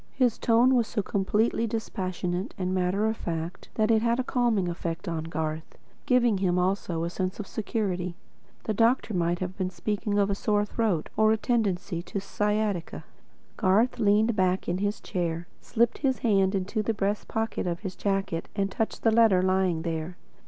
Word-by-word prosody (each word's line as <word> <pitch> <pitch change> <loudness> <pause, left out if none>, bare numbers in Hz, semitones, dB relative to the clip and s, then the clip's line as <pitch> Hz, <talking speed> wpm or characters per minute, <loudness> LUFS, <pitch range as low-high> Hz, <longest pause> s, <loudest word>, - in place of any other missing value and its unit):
His 250 -4 +2
tone 240 +3 +4
was 235 -3 +3
so 210 -3 -2
completely 210 +4 +1
dispassionate 185 -4 -3
and 185 -1 -1
matter 185 +3 +1
of 220 0 +1
fact, 170 -2 -5
that 215 0 +2
it 220 -1 +4
had 235 +1 +1
a - - +1
calming 240 -7 +1
effect 170 +1 -4
on 160 -2 -2
Garth, 160 -1 -4 0.3
giving 240 -5 +3
him 180 -2 +1
also 180 -2 0
a 170 - -1
sense 185 +2 -3
of 210 - -4
security. 190 -5 -2 0.5
The 215 - -1
doctor 230 +1 +2
might 175 -1 +1
have 185 0 -3
been 185 -2 -2
speaking 205 +2 -2
of 200 0 +2
a - - +2
sore 205 +1 +1
throat, 205 -7 -1
or 220 0 +4
a 220 - +3
tendency 200 -7 0
to 200 - -4
sciatica. 210 -2 -1 0.5
Garth 215 +5 +2
leaned 215 +1 +3
back 185 -1 +1
in 175 +1 -1
his 205 +1 -1
chair, 170 -3 -2
slipped 235 0 +1
his 265 -3 +1
hand 195 -3 +3
into 195 +3 -1
the 220 +1 -1
breast 205 +1 -1
pocket 220 -4 -2
of 170 -1 -2
his 190 -3 -5
jacket, 195 -4 -1
and 195 -1 0
touched 225 - -3
a 225 - +6
letter 220 -5 +5
lying 185 -3 +1
there. 165 +1 -3
200 Hz, 180 wpm, -27 LUFS, 180-220 Hz, 0.5 s, a